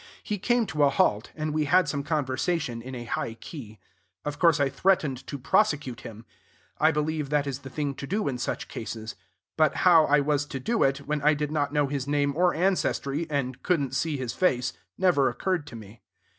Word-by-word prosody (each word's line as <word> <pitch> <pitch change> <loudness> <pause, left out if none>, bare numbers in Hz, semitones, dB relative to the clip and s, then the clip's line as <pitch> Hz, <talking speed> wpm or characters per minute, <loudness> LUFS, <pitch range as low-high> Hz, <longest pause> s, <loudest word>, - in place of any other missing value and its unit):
He 210 -2 -3
came 240 +3 +2
to 155 -6 -3
a 140 - +6
halt; 110 -5 +1
and 155 -1 -3
we 155 -1 +1
had 165 +4 +4
some 145 -1 -1
conversation 140 -3 -1
in 130 +2 -7
a 120 - -6
high 115 -1 -3
key. 115 -5 -10 0.5
Of 150 0 -4
course 165 -3 +4
I 140 - +3
threatened 135 -3 0
to 140 - -5
prosecute 140 - +1
him. 115 -1 -10 0.5
I 155 - +5
believe 150 -1 -1
that 145 -1 +1
is 135 -2 -4
the 135 - -10
thing 145 0 -2
to 135 - -7
do 205 +5 -1
in 130 -3 -2
such - - -3
cases; 110 -1 -6 0.4
but 155 -2 +3
how 165 -3 +7
I 145 0 +4
was 145 0 +1
to 135 - -5
do 225 - -1
it, 135 +1 +1
when 150 0 -1
I 150 +1 +4
did 150 0 -2
not 145 -2 0
know 145 -1 +2
his 140 -1 -3
name 145 -1 +1
or 175 +2 +3
ancestry, 165 -4 0
and 130 -3 -2
couldn't 145 -8 0
see 145 +2 -1
his 125 -3 -4
face, 125 -9 +1 0.2
never 170 -8 +3
occurred 170 +4 -2
to - - -9
me. 110 0 -12
145 Hz, 210 wpm, -27 LUFS, 130-155 Hz, 0.5 s, how